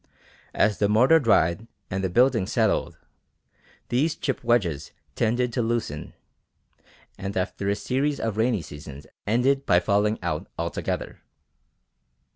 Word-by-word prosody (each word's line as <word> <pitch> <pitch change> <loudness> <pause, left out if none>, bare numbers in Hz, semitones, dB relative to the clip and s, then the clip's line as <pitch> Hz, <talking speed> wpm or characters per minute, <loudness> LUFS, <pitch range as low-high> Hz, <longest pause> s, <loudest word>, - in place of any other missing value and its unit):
As 105 0 +2
the 100 - +2
mortar 125 +10 +5
dried 110 - +2 0.2
and 95 +1 -2
the 95 - 0
building 120 -1 +3
"settled," 110 -2 0 0.9
these 145 +6 +1
chip 135 -4 -3
wedges 95 - +1 0.2
tended 120 +2 0
to 125 - 0
loosen, 115 -10 -3 1.1
and 100 0 -4
after 95 +1 -2
a 100 - +2
series 140 +6 -1
of 110 -3 -2
rainy 110 -4 +1
seasons 75 -1 -10 0.2
ended 130 +5 +2
by 90 -1 +5
falling 105 +2 +1
out - - -2
altogether. - - -3
110 Hz, 125 wpm, -25 LUFS, 95-125 Hz, 1.1 s, mortar